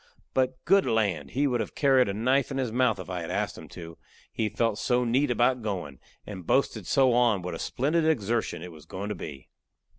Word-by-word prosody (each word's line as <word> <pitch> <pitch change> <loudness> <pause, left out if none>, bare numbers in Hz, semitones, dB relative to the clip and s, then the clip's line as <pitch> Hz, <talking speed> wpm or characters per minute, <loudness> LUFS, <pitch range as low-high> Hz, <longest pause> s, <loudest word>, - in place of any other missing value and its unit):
But 130 0 +1
good 195 +4 +4
land! 100 -11 0
he 140 +3 0
would 125 -3 +1
have 110 - -4
carried 135 -5 +4
a - - -1
knife 130 +5 +2
in 135 - -4
his 130 -4 -1
mouth 120 -2 +2
if 95 - -8
I 90 -1 -4
had 80 - -6
asked - - -2
him - - -11
to, 85 -1 -10 0.3
he 110 -1 -1
felt 110 +1 0
so 125 0 +1
neat 130 +5 +2
about 120 +1 +2
goin', 90 - -4 0.3
and 95 -5 -8
boasted 110 -7 +1
so 130 -3 +4
on 115 -6 +3
what 90 - -4
a - - -6
splendid 155 +5 0
exertion 115 - 0
it 90 - -8
was 75 -2 -14
goin' 100 +5 -5
to 105 - -3
be. 70 -7 -9
115 Hz, 220 wpm, -27 LUFS, 95-130 Hz, 0.3 s, good